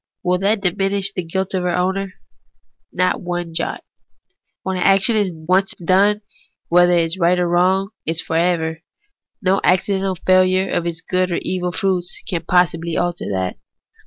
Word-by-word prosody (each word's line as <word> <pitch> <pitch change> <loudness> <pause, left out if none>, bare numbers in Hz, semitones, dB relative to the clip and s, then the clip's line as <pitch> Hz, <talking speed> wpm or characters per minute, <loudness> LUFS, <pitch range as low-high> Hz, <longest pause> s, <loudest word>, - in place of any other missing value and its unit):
Will 180 0 +1
that 200 +2 +1
diminish 195 +1 0
the 185 - -2
guilt 190 +3 -3
of 185 - 0
her 180 0 0
owner? 190 +1 -1 0.8
Not 185 0 0
one 175 -2 -4
jot. - - -3 0.8
Wlien 190 0 -1
an - - -3
action 195 +4 +3
is 205 -3 +1
once 180 +4 0
done, 195 +4 +2 0.5
it 175 +1 +5
is 170 +1 +1
right 175 +1 +3
or 180 -1 +1
wrong 185 +3 +2 0.4
for 160 - -3
ever; 165 -1 0 0.6
no 190 +1 +2
accidental 190 +1 +1
failure 185 0 +3
of 170 - 0
its 165 -1 -4
good 185 +1 0
or 175 - -1
evil 180 -1 -2
fruits 185 -2 -2
can 170 -2 -2
possibly 170 -2 +2
alter 175 0 -1
that. 95 -5 -2
180 Hz, 160 wpm, -19 LUFS, 175-190 Hz, 0.8 s, it